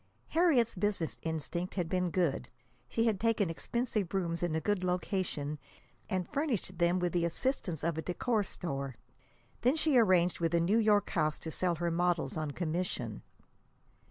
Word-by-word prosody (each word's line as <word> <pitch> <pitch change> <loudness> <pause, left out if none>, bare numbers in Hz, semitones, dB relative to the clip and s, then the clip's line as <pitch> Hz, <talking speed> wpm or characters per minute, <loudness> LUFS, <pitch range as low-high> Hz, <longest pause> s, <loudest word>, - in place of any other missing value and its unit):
Harriet's 300 -9 +3
business 190 -4 -1
instinct 165 +3 -3
had 180 -4 0
been 180 +1 0
good. 165 -8 0 0.4
She 225 - +1
had 215 -4 +2
taken 220 -5 +2
expensive 215 0 -2
rooms 170 -3 -1
in 175 -3 0
a - - +2
good 205 +2 0
location, 180 -5 -1 0.5
and 185 -4 -1
furnished 240 - -2
them 170 +1 +3
with 175 -1 0
the 175 -1 +2
assistance 170 - -1
of 165 -1 0
a - - -1
decor 215 +6 0
store. 140 -9 -4 0.7
Then 255 +5 +3
she 310 -5 +4
arranged 180 -5 +4
with 170 0 +1
a - - +4
New 195 +7 +3
York 210 -2 +3
house 155 0 +1
to 160 - -6
sell 175 +1 0
her 170 +1 -1
models 175 0 +1
on 155 -2 -2
commission. 155 - -3
180 Hz, 165 wpm, -32 LUFS, 165-210 Hz, 0.7 s, she